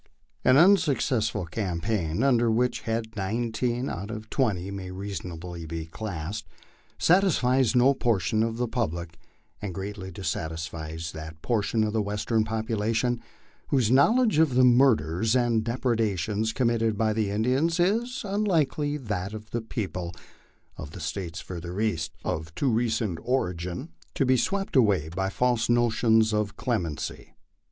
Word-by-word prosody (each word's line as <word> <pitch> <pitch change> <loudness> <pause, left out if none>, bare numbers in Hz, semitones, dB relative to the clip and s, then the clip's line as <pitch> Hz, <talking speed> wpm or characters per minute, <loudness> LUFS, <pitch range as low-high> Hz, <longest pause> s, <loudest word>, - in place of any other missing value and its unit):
An 130 +1 +6
unsuccessful 140 - +3
campaign, 90 +1 -2
under 120 -4 +3
which 120 +2 +1
head 110 0 -2
nineteen 120 +5 -1
out 100 +4 -5
of 110 -1 -7
twenty 100 -8 0
may 95 -2 -6
reasonably 90 -3 -6
be 80 0 -4
classed, 90 +1 -5 0.5
satisfies 135 - +3
no 125 +3 +5
portion 110 -4 +1
of 115 0 0
the 125 0 0
public, 85 -8 -3 0.4
and 100 -4 -5
greatly 100 -1 -5
dissatisfies 80 -2 -4
that 80 0 -8
portion 110 -1 +1
of 105 0 -1
the 110 - +1
Western 105 +2 0
population 110 +2 -1 0.5
whose 125 -5 +2
knowledge 215 - +4
of 155 -6 +3
the 130 - +5
murders 115 - +4
and 120 -3 +2
depredations 110 -3 0
committed 115 -3 +1
by 110 0 +2
the 110 -2 0
Indians 130 - +1
is, 230 +9 +1
unlike 195 -7 +1
that 115 -11 -2
of 110 +1 -10
the 120 - -1
people 90 -6 -4 0.6
of 75 - -8
the - - -8
States 85 +1 -4
further 90 +1 -6
east, 105 -8 0
of 80 0 -3
too 135 -3 +1
recent 110 -6 0
origin 90 - -2 0.3
to 135 - +2
be 130 0 +4
swept 195 +10 -1
away 100 - +3
by 95 +3 -2
false 120 +2 +1
notions 115 -2 +3
of 105 -1 -1
clem 110 -9 0
ency. 75 - -6
110 Hz, 140 wpm, -27 LUFS, 95-125 Hz, 0.6 s, An